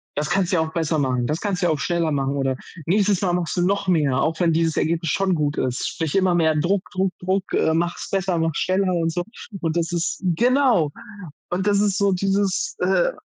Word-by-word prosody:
das 150 +1 -1
kannst 190 -2 +1
du - - +2
ja 165 - +3
auch 160 0 -3
besser 160 -2 0
machen, 130 -4 0
das 150 +2 -1
kannst 200 -2 -2
du 175 - +3
ja - - +2
auch 155 - 0
schneller 170 +2 0
machen“, 135 -1 0
oder 135 -1 0 0.3
„nächstes 200 0 +2
Mal 180 -3 +1
machst 175 -2 -1
du - - +2
noch 200 +2 0
mehr, 150 -7 +2
auch 160 +2 0
wenn 170 -2 +2
dieses 165 -1 +1
Ergebnis 165 -1 0
schon 195 -2 +1
gut 150 -2 -1
ist.“ 130 0 -1
Sprich 165 -2 -3
immer 185 -2 +3
mehr 160 -2 +2
Druck, 180 +5 +1
Druck, 190 0 0
Druck 185 +1 -2
äh, 160 - +2
mach's 170 +1 -2
besser, 190 -3 0
mach 165 -1 0
schneller 185 0 +1
und 165 -1 0
so 175 +1 -1 0.4
und 165 0 -1
das 170 +1 -1
ist 175 +1 -2
genau, 235 - +3 0.6
und 185 +2 -1
das 200 -1 +3
ist 205 -2 +1
so 200 -1 +2
dieses, 195 - 0
äh - - +2
175 Hz, 230 wpm, -22 LUFS, 160-195 Hz, 0.6 s, ja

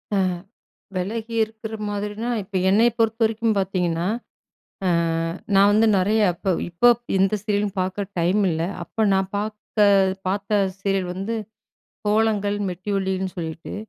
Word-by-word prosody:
அ - - +2 0.8
வெலகி 220 +5 -3
இருக்கிற 220 0 -7
மாதிரினா, 210 +3 -3
இப்ப 195 +1 -11
என்னைய 220 +5 +5
பொறுத்தவரைக்கும் 225 0 +1
பாத்தீங்கன்னா, 180 -3 0 0.8
அ - - +3 0.7
நான் 200 +1 +6
வந்து 220 +2 +4
நறைய 210 +4 +2
இப்ப 185 - -5 0.2
இப்பப் 240 +7 +4 0.2
எந்த 195 +2 +3
சீரியலும் 205 -1 -1
பாக்க 185 +2 -2
டைம் 180 +5 +2
இல்ல. 160 0 -1 0.2
அப்ப 215 +6 -1
நா 190 - +4 0.2
பாத்த 210 +1 -4 0.5
பாத்த 200 +2 -2 0.3
சீரியல் 195 -2 0
வந்து 195 +5 -3 0.7
கோலங்கள், 210 -1 +2
மெட்டி 185 +3 -7
ஒலின்னு 190 -1 -1
சொல்லிட்டு. 160 -1 -5
205 Hz, 125 wpm, -23 LUFS, 190-220 Hz, 0.8 s, நான்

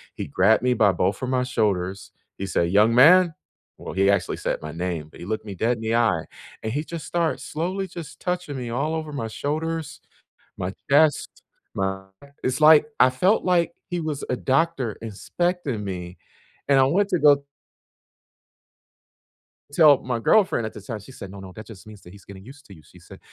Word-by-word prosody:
he - - -5
grabbed 95 +9 +3
me 125 0 +3
by 105 -3 +4
both 95 +3 -1
of 130 - -2
my 130 -1 +1
shoulders, 100 -6 -2 0.3
he 100 - -4
said, 85 -3 0
"Young 105 +4 +4
man." 170 +6 +7 0.5
well, - - -7
he 95 +1 +2
actually 100 - +1
said - - -3
my 75 0 -6
name, 85 -2 -4
but - - -16
he - - -8
looked 110 +3 -3
me 100 -2 -7
dead 115 +6 0
in - - -10
the 110 +1 -1
eye, 110 -9 +1 0.4
and 110 - -3
he 145 +3 -1
just 165 0 -7
started 170 -2 -1
slowly 185 +5 -3
just 170 -3 -10
touching 180 -5 -3
me 125 -2 -5
all 140 +7 -1
over 155 -1 -5
my 135 -6 -4
shoulders, 155 +6 -4 0.6
my 90 +1 -3 0.2
chest, 150 +2 +2 0.3
my 95 0 -2 0.2
and 140 - -17
it's, 130 +3 -1
like 155 0 +7
I 125 - +7
felt 180 +12 +2
like 170 -2 +1 0.2
he 175 -1 -2
was 155 -3 -4
a 125 - +1
doctor 135 -4 0
inspecting 135 - -3
me, 90 -2 -6 0.5
and 140 -1 +4
I - - +6
went 195 +9 +1
to 180 -4 +1
go 145 -2 +5 2.3
tell 145 -2 +6
my 125 -2 -3
girlfriend 185 - +2
at 110 - -6
the 105 - -10
time. 110 +2 -6
She 105 +6 -14
said, 100 -7 -9
"No, 100 +1 -10
no, 95 -1 -10
that 110 -1 -10
just 110 -5 -12
means 105 -2 -13
that 90 - -14
he's 100 0 -16
getting 95 -1 -12
used 135 +4 -14
to 100 - -14
you." 80 - -15
She - - -19
said, - - -14
125 Hz, 205 wpm, -23 LUFS, 100-155 Hz, 2.3 s, man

